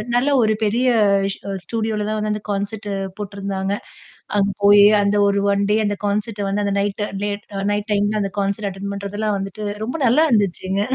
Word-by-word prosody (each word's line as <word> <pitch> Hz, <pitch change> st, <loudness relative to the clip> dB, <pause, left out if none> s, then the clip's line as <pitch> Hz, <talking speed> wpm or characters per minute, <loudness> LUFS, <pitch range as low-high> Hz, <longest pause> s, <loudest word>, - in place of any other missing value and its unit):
நல்ல 260 Hz, +4 st, +3 dB
ஒரு 215 Hz, 0 st, +2 dB
பெரிய 235 Hz, +5 st, +1 dB, 0.5 s
ஸ் -, -, -12 dB, 0.3 s
ஸ்டுடியோல 220 Hz, -1 st, -2 dB
தான் 215 Hz, -, -1 dB
வந்து 210 Hz, 0 st, -1 dB
அந்த 210 Hz, -, -5 dB
கான்செர்ட் 205 Hz, +1 st, -3 dB, 0.3 s
போட்டுருந்தாங்க. 195 Hz, -1 st, -3 dB, 0.6 s
அங்க 200 Hz, 0 st, +3 dB
போயி 205 Hz, 0 st, +8 dB, 0.2 s
அந்த 200 Hz, +1 st, +1 dB
ஒரு 200 Hz, 0 st, +2 dB
1 200 Hz, 0 st, +1 dB
டே 215 Hz, -, +4 dB
அந்த 205 Hz, 0 st, 0 dB
கான்செர்ட் 205 Hz, 0 st, -1 dB
வந்து 205 Hz, +1 st, 0 dB
அந்த 200 Hz, -, 0 dB
நைட் 205 Hz, +1 st, -2 dB, 0.2 s
லேட் 205 Hz, 0 st, -4 dB, 0.3 s
நைட் 205 Hz, +1 st, -3 dB
டைம்ல 205 Hz, +1 st, +1 dB
அந்த 195 Hz, -, -3 dB
கான்செர்ட் 200 Hz, +1 st, -1 dB
அட்டெண்ட் 200 Hz, +1 st, -6 dB
பண்றதெல்லாம் 200 Hz, +1 st, -2 dB
வந்துட்டு 195 Hz, +2 st, -6 dB, 0.2 s
ரொம்ப 250 Hz, -, -4 dB
நல்லா 290 Hz, +7 st, +4 dB
இருந்துச்சுங்க. 195 Hz, -2 st, +1 dB
205 Hz, 175 wpm, -20 LUFS, 200-215 Hz, 0.6 s, போயி